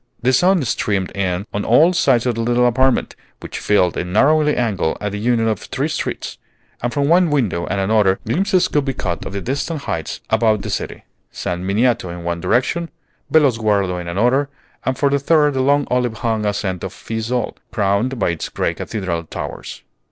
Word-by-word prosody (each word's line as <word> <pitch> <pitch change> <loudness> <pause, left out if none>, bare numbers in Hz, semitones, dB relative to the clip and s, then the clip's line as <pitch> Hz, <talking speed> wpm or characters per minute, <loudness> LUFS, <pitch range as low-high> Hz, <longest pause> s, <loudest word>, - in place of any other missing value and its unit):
The 130 +2 +3
sun 180 +4 +4
streamed 100 -5 -1
in 95 -1 -1
on 105 - -1
all 155 +10 +5
sides 130 -8 +3
of 125 - +1
the 115 - -3
little 120 +1 +2
apartment, 130 +2 +2 0.2
which - - -7
filled 90 -4 +2
a - - -1
narrowing 145 +12 +3
angle 105 -9 0
at 105 -1 -3
the 105 - -4
union 115 0 +1
of 110 -3 0
three - - -3
streets; - - -4 0.4
and 120 - -1
from 140 +1 0
one 175 +2 +4
window 115 - 0
and 95 - -1
another, 95 -1 +3
glimpses 185 - +2
could 150 -5 +1
be 135 -2 -3
caught 85 -3 -3
of - - -8
the 100 - -3
distant 140 - -3
heights 80 - -4
about 110 -2 +2
the - - -4
city, - - -4 0.3
San 90 0 -4
Miniato 115 0 +1
in 85 0 -7
one 85 0 -3
direction, 130 - 0 0.4
Bellosguardo 110 - +2
in 85 - -8
another, 125 +10 +1 0.3
and 130 -1 -1
for 140 -1 +2
the 140 - +2
third 150 0 +3
the 130 - 0
long 140 +1 +3
olive 125 -2 +1
hung 110 -2 0
ascent 95 -3 -2
of - - -4
Fiesole, 115 +2 -3
crowned 105 +5 0
by 95 -5 +1
its 85 - -4
gray - - -1
cathedral 85 -6 -4
towers. - - -7
115 Hz, 190 wpm, -19 LUFS, 100-135 Hz, 0.4 s, all